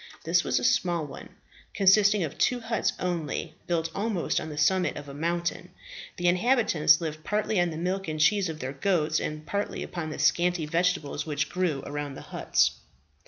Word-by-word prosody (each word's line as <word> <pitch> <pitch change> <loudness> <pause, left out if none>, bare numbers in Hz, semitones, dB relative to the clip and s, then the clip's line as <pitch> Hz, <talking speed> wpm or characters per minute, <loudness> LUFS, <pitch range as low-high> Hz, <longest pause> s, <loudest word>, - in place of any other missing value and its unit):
This 170 +2 +2
was - - 0
a - - -6
small 180 -10 +2
one, 145 - -11 0.4
consisting 200 0 +5
of 155 - -4
two 250 - +1
huts 225 0 -1
only, 170 -2 -3
built 165 -2 -1
almost 200 -3 -1
on 160 - -6
the 150 - -7
summit 180 +4 +2
of 145 0 -8
a 140 - -8
mountain, 170 +3 -2 0.5
the 175 - 0
inhabitants 195 - +4
living 155 -1 -4
partly 210 +2 0
on 175 - +1
the 160 - -6
milk 185 +3 -2
and 155 -1 -3
cheese 195 +3 +3
of 160 - -5
their 130 +1 -4
goats, 155 0 +1
and 155 0 -5
partly 200 +4 -3
upon 170 -3 -5
the 155 - -6
scanty 175 -2 +2
vegetables 165 -2 -1
which 145 -2 -1
grew 170 -7 -1
around 145 -1 -5
the - - -9
huts. - - +1
170 Hz, 185 wpm, -27 LUFS, 155-190 Hz, 0.5 s, consisting